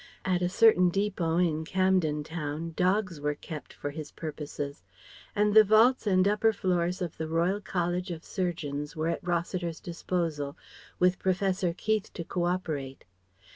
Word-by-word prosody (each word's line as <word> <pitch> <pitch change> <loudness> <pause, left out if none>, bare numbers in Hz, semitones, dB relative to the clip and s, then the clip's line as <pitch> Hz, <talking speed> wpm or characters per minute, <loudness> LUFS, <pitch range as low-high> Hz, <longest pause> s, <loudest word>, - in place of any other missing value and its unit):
At 180 -2 +1
a 180 - +1
certain 185 -3 +5
depôt 180 -3 +1
in 160 -1 -2
Camden 180 -4 +1
Town 160 +1 -4
dogs 185 -3 +1
were 150 0 0
kept 150 0 -8
for 145 - -5
his 150 0 -7
purposes. 145 -2 -6 0.5
And 210 0 +3
the 220 0 +9
vaults 220 +3 +4
and 185 -1 +4
upper 210 +2 +3
floors 180 -1 0
of 170 - -5
the 160 - -3
Royal 170 +5 +1
College 180 -1 -1
of 165 -2 -6
Surgeons 150 -6 -3
were 160 +1 -1
at - - -2
Rossiter's 175 -1 -2
disposal, 165 -4 -3 0.4
with 180 0 +3
Professor 190 -1 +1
Keith 215 +4 -1
to 170 - -4
co 175 +1 -2
operate. 155 -7 -3
175 Hz, 155 wpm, -29 LUFS, 160-190 Hz, 0.5 s, the